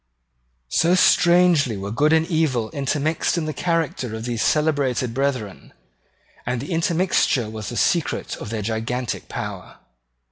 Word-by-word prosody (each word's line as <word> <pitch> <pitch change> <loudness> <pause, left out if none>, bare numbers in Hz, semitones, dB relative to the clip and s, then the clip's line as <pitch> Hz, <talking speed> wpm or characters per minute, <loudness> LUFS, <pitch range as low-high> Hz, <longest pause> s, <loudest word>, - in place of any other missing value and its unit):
So 170 - +3
strangely 175 - +4
were 100 +1 -5
good 150 +7 +2
and 160 0 +4
evil 155 - 0
intermixed 145 +4 -1
in 165 - -1
the 155 - -3
character 160 -10 -2
of 110 +1 -6
these 120 -2 -2
celebrated 140 -6 +1
brethren; 130 -7 -3 0.7
and 125 0 -2
the 140 - -6
intermixture 165 - +1
was 110 -2 -6
the 120 - -5
secret 170 -3 0
of 105 - -7
their 110 -2 -3
gigantic 115 +3 -3
power. - - -6
140 Hz, 140 wpm, -22 LUFS, 115-160 Hz, 0.7 s, strangely